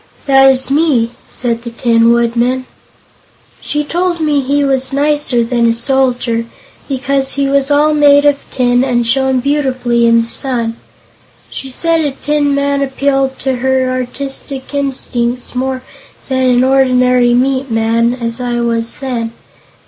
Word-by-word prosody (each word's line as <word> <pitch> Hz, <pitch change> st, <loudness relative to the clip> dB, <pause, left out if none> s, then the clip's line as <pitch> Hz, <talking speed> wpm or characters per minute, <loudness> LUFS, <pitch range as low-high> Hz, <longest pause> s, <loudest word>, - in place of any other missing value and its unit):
"That 270 Hz, -1 st, +5 dB
is 265 Hz, 0 st, +1 dB
me," 275 Hz, -6 st, +2 dB, 0.2 s
said 235 Hz, -2 st, -2 dB
the 235 Hz, -, -7 dB
Tin 230 Hz, -1 st, +2 dB
Woodman. 235 Hz, +2 st, 0 dB, 0.9 s
"She 295 Hz, 0 st, -2 dB
told 345 Hz, +3 st, -1 dB
me 300 Hz, -3 st, +1 dB
he 285 Hz, +2 st, 0 dB
was 265 Hz, -1 st, 0 dB
nicer 285 Hz, -3 st, +1 dB
than 235 Hz, 0 st, +1 dB
a 230 Hz, -, +2 dB
soldier, 245 Hz, -2 st, 0 dB, 0.4 s
because 270 Hz, 0 st, 0 dB
he 280 Hz, 0 st, 0 dB
was 275 Hz, 0 st, +1 dB
all 295 Hz, +1 st, +3 dB
made 290 Hz, -1 st, +4 dB
of 290 Hz, -1 st, +4 dB
tin 245 Hz, -1 st, +1 dB
and 240 Hz, -3 st, 0 dB
shone 265 Hz, +1 st, +1 dB
beautifully 255 Hz, -4 st, 0 dB
in 230 Hz, 0 st, +4 dB
the 230 Hz, -, -4 dB
sun. 235 Hz, -2 st, -1 dB, 0.8 s
She 270 Hz, -, -7 dB
said 330 Hz, +5 st, 0 dB
a 295 Hz, -, 0 dB
tin 290 Hz, 0 st, 0 dB
man 280 Hz, 0 st, 0 dB
appealed 270 Hz, 0 st, -1 dB
to 265 Hz, -2 st, -1 dB
her 260 Hz, 0 st, 0 dB
artistic 265 Hz, +2 st, -5 dB
instincts 255 Hz, -3 st, -2 dB
more 260 Hz, 0 st, -3 dB, 0.5 s
than 260 Hz, -1 st, +1 dB
an 245 Hz, 0 st, +3 dB
ordinary 250 Hz, -2 st, +3 dB
meat 265 Hz, +1 st, 0 dB
man, 230 Hz, +1 st, +1 dB
as 230 Hz, 0 st, -4 dB
I 240 Hz, -1 st, -2 dB
was 230 Hz, -1 st, -2 dB
then. 240 Hz, -4 st, -4 dB
260 Hz, 150 wpm, -13 LUFS, 240-280 Hz, 0.9 s, That